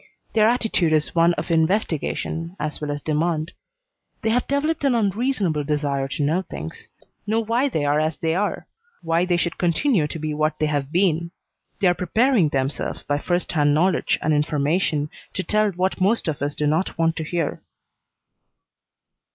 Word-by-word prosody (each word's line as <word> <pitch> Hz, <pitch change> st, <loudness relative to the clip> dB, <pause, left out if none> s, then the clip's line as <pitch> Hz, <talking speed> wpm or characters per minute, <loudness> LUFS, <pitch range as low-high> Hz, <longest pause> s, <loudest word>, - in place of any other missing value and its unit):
Their 220 Hz, 0 st, +5 dB
attitude 220 Hz, -9 st, +1 dB
is 155 Hz, -1 st, +1 dB
one 170 Hz, 0 st, +4 dB
of 160 Hz, +2 st, -4 dB
investigation 165 Hz, -1 st, 0 dB
as 150 Hz, 0 st, -4 dB
well 150 Hz, -, -3 dB
as 145 Hz, 0 st, -4 dB
demand. 155 Hz, +1 st, -1 dB, 0.7 s
They 220 Hz, -, +2 dB
have 245 Hz, +2 st, +1 dB
developed 290 Hz, +3 st, 0 dB
an 270 Hz, -3 st, +3 dB
unreasonable 205 Hz, -, 0 dB
desire 145 Hz, -2 st, -1 dB
to 145 Hz, +2 st, -2 dB
know 160 Hz, +6 st, +1 dB
things; 80 Hz, -, -8 dB, 0.4 s
know 220 Hz, +2 st, +2 dB
why 230 Hz, +5 st, +1 dB
they 155 Hz, -, -1 dB
are 145 Hz, +1 st, +2 dB
as 155 Hz, 0 st, -1 dB
they 160 Hz, 0 st, 0 dB
are; 200 Hz, +4 st, -1 dB, 0.4 s
why 165 Hz, +2 st, +2 dB
they 175 Hz, -1 st, +1 dB
should 170 Hz, 0 st, -2 dB
continue 175 Hz, -, +2 dB
to 155 Hz, -, -6 dB
be 155 Hz, -1 st, -3 dB
what 155 Hz, +1 st, 0 dB
they 155 Hz, -, +1 dB
have 145 Hz, -2 st, -1 dB
been. 170 Hz, -2 st, +2 dB, 0.5 s
They 195 Hz, -, +4 dB
are 175 Hz, -, +5 dB
preparing 215 Hz, -, +2 dB
themselves 135 Hz, 0 st, -2 dB
by 145 Hz, 0 st, -1 dB
first 175 Hz, +3 st, -1 dB
hand 145 Hz, -3 st, +3 dB
knowledge 180 Hz, +4 st, +2 dB
and 155 Hz, -, +2 dB
information 150 Hz, +1 st, 0 dB, 0.2 s
to 185 Hz, -, -1 dB
tell 215 Hz, +1 st, +2 dB
what 185 Hz, +1 st, -1 dB
most 205 Hz, +3 st, +2 dB
of 150 Hz, -4 st, -2 dB
us 145 Hz, +1 st, -2 dB
do 150 Hz, -, -1 dB
not 160 Hz, +5 st, 0 dB
want 165 Hz, -1 st, +2 dB
to 160 Hz, -, -2 dB
hear." 165 Hz, -1 st, -2 dB
165 Hz, 175 wpm, -23 LUFS, 150-195 Hz, 0.7 s, Their